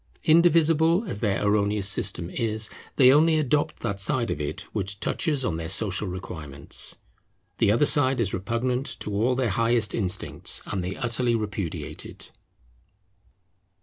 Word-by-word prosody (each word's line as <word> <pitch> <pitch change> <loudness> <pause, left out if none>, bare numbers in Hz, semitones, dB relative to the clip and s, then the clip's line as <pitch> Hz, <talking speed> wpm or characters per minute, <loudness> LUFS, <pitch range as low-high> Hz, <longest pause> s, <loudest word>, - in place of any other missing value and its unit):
Indivisible 165 +2 +4
as 160 - -5
their 105 -2 0
erroneous 100 -1 +1
system 95 -4 0
is, 110 -2 -2 0.2
they 130 -2 +6
only 160 +2 +4
adopt 150 +1 0
that 100 -4 -3
side 120 +4 0
of 75 - -3
it 75 - -4
which 100 -1 -3
touches 145 - -1
on 80 -2 -1
their 80 0 -5
social 100 +1 -1
requirements. 75 -6 -4 0.6
The - - +4
other 120 +7 +3
side 135 -3 +3
is 105 -5 -1
repugnant 120 +7 -2
to 105 - -5
all 115 +5 +1
their 125 -4 0
highest 115 0 +1
instincts, 95 -5 0
and 95 - -3
they 90 +2 -4
utterly 120 -1 0
repudiate 105 -6 -4
it. - - -10
110 Hz, 150 wpm, -25 LUFS, 95-130 Hz, 0.6 s, they